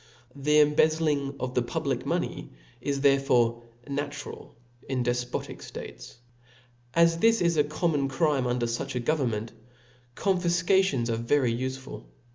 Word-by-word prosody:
The 150 Hz, +2 st, +3 dB
embezzling 150 Hz, -2 st, +2 dB
of 130 Hz, 0 st, -3 dB
the 125 Hz, -, +2 dB
public 120 Hz, -, -2 dB
pioney -, -, -2 dB, 0.3 s
is 140 Hz, +1 st, -2 dB
therefore 125 Hz, -4 st, +3 dB, 0.3 s
natural 145 Hz, +1 st, -6 dB, 0.3 s
in 130 Hz, -2 st, 0 dB
defpbtic 120 Hz, 0 st, -2 dB
ftates. -, -, -9 dB, 0.8 s
'As 165 Hz, 0 st, +4 dB
this 225 Hz, +2 st, +4 dB
is 170 Hz, -1 st, +2 dB
a 150 Hz, -, +4 dB
common 150 Hz, -1 st, 0 dB
crime 135 Hz, -2 st, +1 dB
under 120 Hz, -1 st, 0 dB
fuch 115 Hz, +2 st, -3 dB
a -, -, 0 dB
govern 135 Hz, +1 st, +1 dB
ment, 110 Hz, 0 st, -4 dB, 0.6 s
confifcations 180 Hz, -, +2 dB
are 115 Hz, -, 0 dB
very 120 Hz, +1 st, +1 dB
ufeful. 130 Hz, +2 st, -5 dB
140 Hz, 130 wpm, -27 LUFS, 125-155 Hz, 0.8 s, As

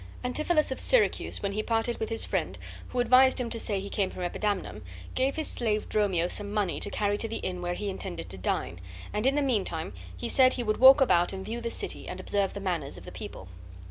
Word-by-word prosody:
Antipholus 305 Hz, +4 st, +1 dB
of 265 Hz, -, -3 dB
Syracuse, 485 Hz, -, +2 dB
when 200 Hz, -, 0 dB
he 210 Hz, +2 st, -1 dB
parted 225 Hz, +1 st, -1 dB
with 220 Hz, -, -2 dB
his 225 Hz, -, +1 dB
friend, -, -, -2 dB, 0.3 s
who, 250 Hz, -, -3 dB
advised 255 Hz, +2 st, +5 dB
him 240 Hz, -2 st, -3 dB
to 230 Hz, -, -3 dB
say 205 Hz, -3 st, 0 dB
he 195 Hz, -, -6 dB
came 200 Hz, -1 st, 0 dB
from 180 Hz, -, -6 dB
Epidamnum, 185 Hz, -, -2 dB, 0.3 s
gave 265 Hz, +2 st, +1 dB
his 315 Hz, -, -3 dB
slave 215 Hz, -3 st, -1 dB
Dromio 190 Hz, -5 st, +1 dB
some 205 Hz, +2 st, -3 dB
money 205 Hz, -4 st, 0 dB
to -, -, -3 dB
carry 205 Hz, 0 st, 0 dB
to 225 Hz, -, 0 dB
the 225 Hz, -, -5 dB
inn 180 Hz, -1 st, -4 dB
where 175 Hz, 0 st, -2 dB
he 205 Hz, -, -4 dB
intended 85 Hz, -, -5 dB
to 95 Hz, -, -8 dB
dine, 85 Hz, -1 st, -2 dB, 0.3 s
and 210 Hz, +4 st, +1 dB
in 275 Hz, -, +3 dB
the 295 Hz, -, +2 dB
mean 240 Hz, -8 st, +2 dB
time 160 Hz, -, -4 dB, 0.2 s
he -, -, -3 dB
said 260 Hz, -1 st, +5 dB
he 245 Hz, -, -2 dB
would 215 Hz, -1 st, 0 dB
walk 265 Hz, +2 st, +8 dB
about 175 Hz, -8 st, +3 dB
and 190 Hz, 0 st, -6 dB
view 235 Hz, +2 st, -4 dB
the 235 Hz, -, -2 dB
city -, -, -3 dB
and 180 Hz, -, -6 dB
observe 195 Hz, +1 st, 0 dB
the -, -, -4 dB
manners 175 Hz, -8 st, -3 dB
of -, -, -11 dB
the -, -, -9 dB
people. 95 Hz, -, -8 dB
210 Hz, 240 wpm, -28 LUFS, 185-250 Hz, 0.3 s, walk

